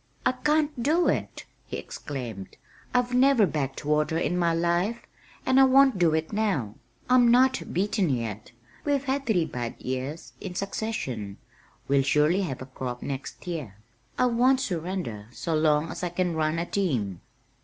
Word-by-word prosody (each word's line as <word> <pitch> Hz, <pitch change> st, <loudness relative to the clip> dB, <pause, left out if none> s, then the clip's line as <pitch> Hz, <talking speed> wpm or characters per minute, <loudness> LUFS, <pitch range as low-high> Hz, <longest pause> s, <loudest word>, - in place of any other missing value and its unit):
"I -, -, +5 dB
can't 295 Hz, +1 st, 0 dB
do 320 Hz, +8 st, +3 dB
it!" -, -, -2 dB, 0.2 s
he -, -, -4 dB
exclaimed. 120 Hz, -9 st, -7 dB, 0.3 s
"I've 250 Hz, 0 st, +1 dB
never 255 Hz, -3 st, +5 dB
'backed 145 Hz, -5 st, -3 dB
water' 150 Hz, +2 st, +1 dB
in 170 Hz, -, 0 dB
my 170 Hz, -1 st, +2 dB
life, 175 Hz, +7 st, 0 dB, 0.4 s
and 260 Hz, +1 st, +4 dB
I -, -, +8 dB
won't 265 Hz, -4 st, +5 dB
do 165 Hz, -3 st, +4 dB
it 160 Hz, +5 st, -2 dB
now. 190 Hz, -, 0 dB, 0.3 s
I'm 250 Hz, -1 st, +5 dB
not 255 Hz, +2 st, +4 dB
beaten 195 Hz, -1 st, +1 dB
yet. 115 Hz, -5 st, -3 dB, 0.3 s
We've 285 Hz, -2 st, +1 dB
had 275 Hz, 0 st, -2 dB
three 180 Hz, -8 st, +2 dB
bad 120 Hz, -4 st, -5 dB
years 130 Hz, +5 st, -5 dB
in 185 Hz, -3 st, -6 dB
succession 135 Hz, -, -3 dB, 0.5 s
we'll 140 Hz, 0 st, +4 dB
surely 150 Hz, +7 st, +3 dB
have 135 Hz, -9 st, -4 dB
a -, -, -9 dB
crop 125 Hz, -1 st, -6 dB
next 140 Hz, +5 st, -6 dB
year. 150 Hz, -, -5 dB, 0.4 s
I 255 Hz, -, +3 dB
won't 250 Hz, +2 st, +3 dB
surrender 170 Hz, -, -3 dB
so 145 Hz, +8 st, -3 dB
long 155 Hz, 0 st, +2 dB
as -, -, -6 dB
I 175 Hz, -, 0 dB
can 175 Hz, 0 st, -1 dB
run 155 Hz, 0 st, 0 dB
a 170 Hz, -, -1 dB
team." 125 Hz, -, -1 dB
170 Hz, 165 wpm, -26 LUFS, -, 0.5 s, I